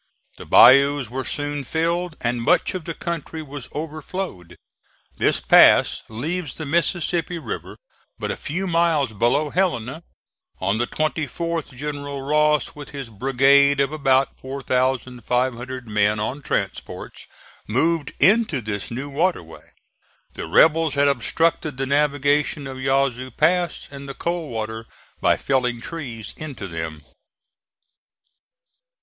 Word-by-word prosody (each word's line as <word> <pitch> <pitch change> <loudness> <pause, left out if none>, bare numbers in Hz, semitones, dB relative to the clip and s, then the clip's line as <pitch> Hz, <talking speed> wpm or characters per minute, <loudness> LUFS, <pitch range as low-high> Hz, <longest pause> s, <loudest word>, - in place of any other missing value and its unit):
The - - -11
bayous 140 0 +6
were 130 +1 -3
soon 145 +2 -3
filled 170 +4 -1
and 120 0 -1
much 115 - +2
of 180 -4 -5
the 165 - -5
country 165 -2 -5
was 145 -3 -8
overflowed. 155 - -6 0.6
This - - +2
pass - - +6
leaves 150 +8 -4
the 160 - -6
Mississippi 170 +2 0
River 165 - -6 0.4
but - - -3
a - - -3
few 180 +6 -4
miles 165 -8 +1
below 120 +8 +1
Helena. 160 -6 -1 0.6
On 100 +4 0
the 120 - 0
24th 160 0 -3
General 145 0 -5
Ross, 150 +1 +2
with 145 -1 -10
his 135 -5 -7
brigade 135 +4 +4
of 140 +1 +2
about 135 -3 +1
4,500 130 -1 -2
men 105 0 +1
on 125 +7 -3
transports, - - -4 0.4
moved 150 +6 +1
into 200 - +4
this 105 -3 -4
new 130 +4 -5
water 160 - 0
way. 80 0 -15 0.6
The - - -6
rebels 160 -2 +4
had 140 0 +3
obstructed 155 +3 0
the 135 - -1
navigation 145 +1 +1
of 130 -1 -7
Yazoo 135 -1 0
Pass 170 +4 +1
and 140 0 -9
the 135 - -6
Coldwater 115 -10 -4 0.3
by - - +3
felling 125 -3 0
trees 120 -6 -7
into 140 -10 -7
them. 80 -3 -6
140 Hz, 125 wpm, -22 LUFS, 125-155 Hz, 0.6 s, bayous